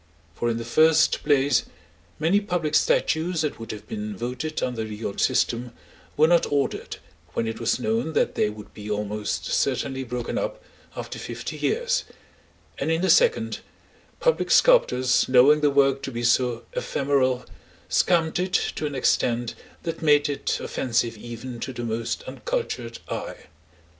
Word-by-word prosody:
For 120 Hz, -, -1 dB
in 115 Hz, -, -1 dB
the 115 Hz, -, -5 dB
first 160 Hz, +6 st, +4 dB
place, 145 Hz, -1 st, +3 dB, 0.5 s
many 165 Hz, +6 st, +3 dB
public 175 Hz, -6 st, -2 dB
statues 180 Hz, -, +2 dB
that 150 Hz, -6 st, -2 dB
would 115 Hz, -, -6 dB
have 105 Hz, 0 st, -9 dB
been 105 Hz, -2 st, -5 dB
voted 125 Hz, +7 st, -3 dB
under 120 Hz, -3 st, -2 dB
the 110 Hz, 0 st, -6 dB
old 100 Hz, -, -3 dB
system, 120 Hz, +1 st, +1 dB, 0.4 s
were 155 Hz, +2 st, +6 dB
not 170 Hz, -2 st, +3 dB
ordered, 140 Hz, -1 st, -1 dB, 0.4 s
when 115 Hz, -, -1 dB
it 115 Hz, -, -4 dB
was 115 Hz, 0 st, 0 dB
known 220 Hz, -7 st, -1 dB
that -, -, +1 dB
they 105 Hz, -, +1 dB
would 105 Hz, 0 st, -11 dB
be 105 Hz, 0 st, -8 dB
almost 105 Hz, -6 st, -2 dB
certainly 135 Hz, -, 0 dB
broken 125 Hz, -1 st, -3 dB
up -, -, -3 dB, 0.4 s
after -, -, -6 dB
fifty -, -, -6 dB
years, 485 Hz, +3 st, 0 dB, 0.8 s
and -, -, -1 dB
in 165 Hz, +2 st, +1 dB
the 190 Hz, -, +4 dB
second, 480 Hz, -1 st, +3 dB, 0.6 s
public -, -, +1 dB
sculptors 130 Hz, -, +4 dB
knowing 135 Hz, +4 st, +6 dB
their 145 Hz, -, +4 dB
work 135 Hz, -1 st, +3 dB
to 135 Hz, -, -5 dB
be 120 Hz, -1 st, -4 dB
so 120 Hz, 0 st, +2 dB
ephemeral, 130 Hz, -3 st, 0 dB, 0.4 s
scamped 165 Hz, -2 st, +2 dB
it 185 Hz, 0 st, -2 dB
to 155 Hz, -, 0 dB
an 145 Hz, -, -5 dB
extent 120 Hz, -2 st, +1 dB, 0.3 s
that 165 Hz, -, -4 dB
made 145 Hz, -2 st, +4 dB
it 145 Hz, -1 st, -2 dB
offensive 115 Hz, -2 st, -1 dB
even 120 Hz, +2 st, -8 dB
to 130 Hz, -, -4 dB
the 120 Hz, -1 st, -6 dB
most 115 Hz, 0 st, -3 dB
uncultured 130 Hz, -, -4 dB
eye. -, -, -5 dB
135 Hz, 160 wpm, -25 LUFS, 115-160 Hz, 0.8 s, were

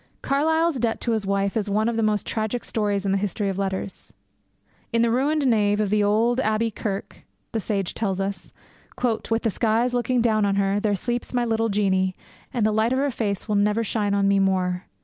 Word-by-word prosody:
Carlyle's 320 Hz, +1 st, +1 dB
debt 230 Hz, -1 st, 0 dB
to 235 Hz, -, 0 dB
his 215 Hz, -3 st, -1 dB
wife 200 Hz, 0 st, 0 dB
is 210 Hz, -2 st, -1 dB
one 215 Hz, +2 st, +1 dB
of 235 Hz, -, 0 dB
the 225 Hz, -, 0 dB
most 210 Hz, -2 st, +1 dB
tragic 220 Hz, +2 st, -2 dB
stories 205 Hz, -2 st, -1 dB
in 195 Hz, -, +1 dB
the 195 Hz, -, +2 dB
history 205 Hz, 0 st, -1 dB
of 195 Hz, 0 st, -3 dB
letters. 190 Hz, 0 st, -4 dB, 0.8 s
'In 230 Hz, -1 st, +2 dB
the 235 Hz, -, +2 dB
ruined 285 Hz, +4 st, +1 dB
nave 210 Hz, -4 st, +2 dB
of 210 Hz, -2 st, 0 dB
the 210 Hz, 0 st, +3 dB
old 225 Hz, +4 st, +2 dB
Abbey 220 Hz, -1 st, +1 dB
Kirk,' 200 Hz, -1 st, -5 dB, 0.3 s
the 225 Hz, -, -1 dB
sage 195 Hz, -3 st, -2 dB
tells 195 Hz, -4 st, -2 dB
us, 195 Hz, -1 st, -4 dB, 0.8 s
'with 225 Hz, 0 st, 0 dB
the 225 Hz, -, +1 dB
skies 230 Hz, +4 st, +1 dB
looking 245 Hz, +1 st, +1 dB
down 220 Hz, -2 st, +2 dB
on 200 Hz, -1 st, +2 dB
her, 200 Hz, 0 st, +1 dB
there 205 Hz, -1 st, +1 dB
sleeps 240 Hz, +4 st, -3 dB
my 245 Hz, -1 st, +2 dB
little 225 Hz, 0 st, 0 dB
Jeannie, 190 Hz, -2 st, +1 dB, 0.4 s
and 240 Hz, -5 st, 0 dB
the 215 Hz, -, +3 dB
light 220 Hz, +3 st, +2 dB
of -, -, +1 dB
her 280 Hz, +1 st, +1 dB
face 205 Hz, -5 st, -3 dB
will 210 Hz, -, -1 dB
never 210 Hz, +2 st, +2 dB
shine 205 Hz, -2 st, 0 dB
on 200 Hz, 0 st, +2 dB
me 200 Hz, 0 st, +3 dB
more. 185 Hz, -2 st, 0 dB
215 Hz, 215 wpm, -24 LUFS, 200-230 Hz, 0.8 s, the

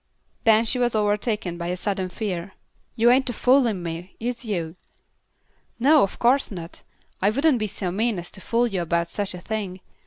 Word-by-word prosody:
Then 225 Hz, 0 st, +5 dB
she 250 Hz, +3 st, +1 dB
was 240 Hz, -2 st, +2 dB
overtaken 210 Hz, -4 st, 0 dB
by 170 Hz, -, -3 dB
a 180 Hz, +1 st, -2 dB
sudden 190 Hz, -1 st, -2 dB
fear. 185 Hz, -2 st, -4 dB, 0.4 s
"Yuh 235 Hz, +1 st, +5 dB
ain't 265 Hz, +1 st, +3 dB
a -, -, -2 dB
foolin' 240 Hz, -6 st, +3 dB
me, 170 Hz, +2 st, -6 dB
is 240 Hz, +2 st, -3 dB
yuh?" 175 Hz, -8 st, -3 dB, 1.1 s
"No, 290 Hz, +4 st, +6 dB
of 195 Hz, -, 0 dB
course 260 Hz, +4 st, +3 dB
not. 170 Hz, -4 st, -8 dB, 0.4 s
I 195 Hz, -, +4 dB
wouldn't 275 Hz, +3 st, +2 dB
be 215 Hz, -, -1 dB
so 190 Hz, -2 st, -4 dB
mean 220 Hz, +3 st, 0 dB
as 175 Hz, 0 st, -6 dB
to 190 Hz, -, -11 dB
fool 235 Hz, +4 st, +1 dB
you 195 Hz, -6 st, -1 dB
about 170 Hz, 0 st, 0 dB
such 200 Hz, -1 st, -3 dB
a -, -, -7 dB
thing. 195 Hz, -1 st, -4 dB
210 Hz, 190 wpm, -24 LUFS, 180-235 Hz, 1.1 s, No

